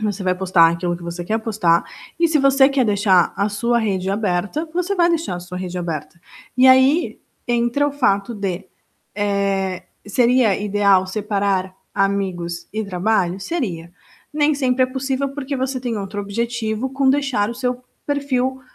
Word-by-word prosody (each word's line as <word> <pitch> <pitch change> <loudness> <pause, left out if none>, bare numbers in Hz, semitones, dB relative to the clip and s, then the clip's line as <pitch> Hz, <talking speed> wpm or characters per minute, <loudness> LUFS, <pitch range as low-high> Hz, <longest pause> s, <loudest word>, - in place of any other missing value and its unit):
Você 210 -2 -2
vai 185 -1 +1
postar 180 -3 +4
aquilo 175 +1 -2
que 175 - -13
você 170 +1 -5
quer 220 +4 0
postar 200 -7 +1 0.3
e, 335 - +4
se 315 -2 +2
você 275 -1 +5
quer 275 -2 +1
deixar 200 -4 +3
a 200 +1 +1
sua 235 +4 0
rede 195 -4 -1
aberta, 205 - -1
você 360 +2 -1
vai 345 -1 +4
deixar 330 - -1
a - - -7
sua 180 +1 -8
rede 180 -1 -5
aberta. 170 -1 -5 0.4
E 255 +1 +6
aí, 260 +6 +4 0.3
entra 240 +4 +1
o 290 - -2
fato 235 -5 +1
de, 195 -3 -4 0.5
eh, 195 -2 -1 0.2
seria 240 -1 +3
ideal 200 -2 +2
separar 195 -2 -1 0.2
amigos 190 -3 -1
e 220 +1 -2
trabalho? 190 -1 0
Seria. 190 - -4 0.4
Nem 300 0 +2
sempre 260 -2 +1
é - - +3
possível 265 +1 -2
porque 275 0 -4
você 260 0 -2
tem 240 -3 -3
outro 205 +1 -5
objetivo 225 +3 -2
com 270 0 +1
deixar 265 -7 +1
o - - -6
seu 250 0 -3 0.2
perfil 265 -2 -1
215 Hz, 165 wpm, -20 LUFS, 190-260 Hz, 0.5 s, E